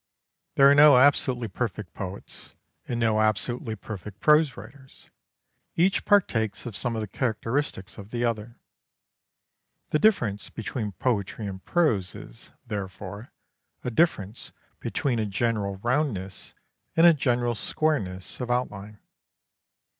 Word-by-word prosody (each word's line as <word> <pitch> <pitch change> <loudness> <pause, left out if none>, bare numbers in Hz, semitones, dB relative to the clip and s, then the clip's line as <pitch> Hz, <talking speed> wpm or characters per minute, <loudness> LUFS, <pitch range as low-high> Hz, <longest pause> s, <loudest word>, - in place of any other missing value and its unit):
There 140 - +7
are 140 - +7
no 145 -2 +8
absolutely 130 -3 +3
perfect 105 -3 -4
poets 95 0 -7 0.3
and 120 - -2
no 110 -2 +2
absolutely 110 +2 -1
perfect 105 -1 -8
prose 150 -1 +4
writers. 130 +6 -13 0.6
Each 185 +4 +2
partakes 110 - +2
of 115 -4 -6
some 120 +1 -1
of 110 - -2
the 110 - -4
characteristics 115 -1 -2
of 100 0 -10
the 120 +1 -1
other. 115 0 -3 1.3
The 150 - +2
difference 115 - +2
between 110 -2 -4
poetry 110 -1 -2
and 95 -1 -6
prose 110 - +1
is, 115 - -9 0.2
therefore, 100 0 -6 0.5
a 125 - -2
difference 115 - 0 0.3
between 125 -5 -1
a 110 - 0
general 100 -1 -1
roundness 120 -8 -2 0.4
and 165 - +6
a 170 - +9
general 120 -4 +1
squareness 105 -7 -2
of 125 - -4
outline. 105 -4 -2
115 Hz, 125 wpm, -26 LUFS, 100-130 Hz, 1.3 s, a